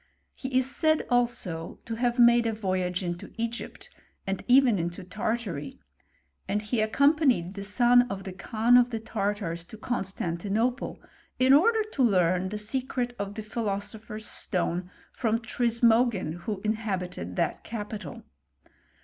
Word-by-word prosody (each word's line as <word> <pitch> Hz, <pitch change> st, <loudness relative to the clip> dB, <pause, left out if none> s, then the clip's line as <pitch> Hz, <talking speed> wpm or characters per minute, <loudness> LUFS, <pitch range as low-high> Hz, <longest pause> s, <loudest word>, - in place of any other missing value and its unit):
He 260 Hz, -1 st, -2 dB
is 260 Hz, -, +4 dB
said 315 Hz, -1 st, +2 dB
also 235 Hz, -9 st, -1 dB
to 230 Hz, -, -4 dB
have 240 Hz, +1 st, 0 dB
made 235 Hz, -1 st, +6 dB
a 225 Hz, -, 0 dB
voyage 185 Hz, -3 st, -1 dB
into 175 Hz, -1 st, -5 dB
Egypt, 230 Hz, +1 st, -5 dB, 0.4 s
und 195 Hz, -1 st, -3 dB
even 250 Hz, -5 st, +5 dB
into 170 Hz, +1 st, -4 dB
Tartary; 215 Hz, -, -3 dB, 0.7 s
and 200 Hz, +2 st, 0 dB
he 215 Hz, +2 st, -1 dB
accompanied 260 Hz, -, +3 dB
the 200 Hz, -1 st, -6 dB
son 245 Hz, +4 st, +4 dB
of 195 Hz, -1 st, -5 dB
the 190 Hz, -, -6 dB
Kan 225 Hz, +5 st, +3 dB
of 245 Hz, 0 st, +4 dB
the 225 Hz, -2 st, -3 dB
Tartars 200 Hz, -6 st, -2 dB
to 220 Hz, -, -11 dB
Constantinople, 210 Hz, +2 st, -2 dB, 0.4 s
in 260 Hz, +1 st, +5 dB
order 435 Hz, +9 st, +5 dB
t9 -, -, -12 dB
learn 185 Hz, -1 st, +2 dB
the 210 Hz, -, -4 dB
secret 245 Hz, +2 st, -2 dB
of 200 Hz, 0 st, -4 dB
the 220 Hz, -, -5 dB
philosopher's 215 Hz, 0 st, -4 dB
stone 180 Hz, -2 st, -1 dB, 0.3 s
fron^ 225 Hz, -2 st, +1 dB
Tfismogin, 230 Hz, -5 st, +2 dB
who 205 Hz, -3 st, -3 dB
inhabited 190 Hz, -, -3 dB
that -, -, -1 dB
capital. 210 Hz, -1 st, -6 dB
220 Hz, 140 wpm, -27 LUFS, 190-240 Hz, 0.7 s, made